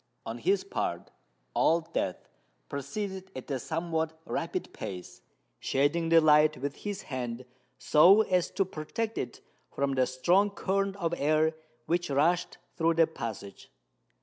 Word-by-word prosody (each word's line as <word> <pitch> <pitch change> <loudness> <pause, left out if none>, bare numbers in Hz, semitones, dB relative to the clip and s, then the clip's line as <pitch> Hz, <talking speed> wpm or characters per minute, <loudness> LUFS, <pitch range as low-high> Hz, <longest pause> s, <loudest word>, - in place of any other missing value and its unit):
On - - -5
his 395 +1 +2
part, 395 +2 -3 0.4
Old 165 +1 +2
Death 90 - -2 0.4
proceeded 190 +7 -5
at 130 +2 -7
a 135 - -1
somewhat 160 +2 -2
rapid - - -3
pace, 90 -2 -7 0.4
shading 145 +5 +1
the 165 0 +7
light 155 -1 +5
with 140 +2 -4
his 205 0 -5
hand 125 -2 -5 0.3
so 180 +8 +6
as 185 -4 +1
to 195 - 0
protect 205 +7 -4
it - - -5 0.3
from 140 0 -1
the 130 -1 +2
strong 175 +11 +3
current 195 0 -1
of 170 -4 -2
air 155 +2 +2 0.3
which 175 0 0
rushed 160 +6 +1 0.2
through 165 -1 +2
the 165 0 +6
passage. 110 -10 -7
160 Hz, 140 wpm, -29 LUFS, 140-185 Hz, 0.4 s, the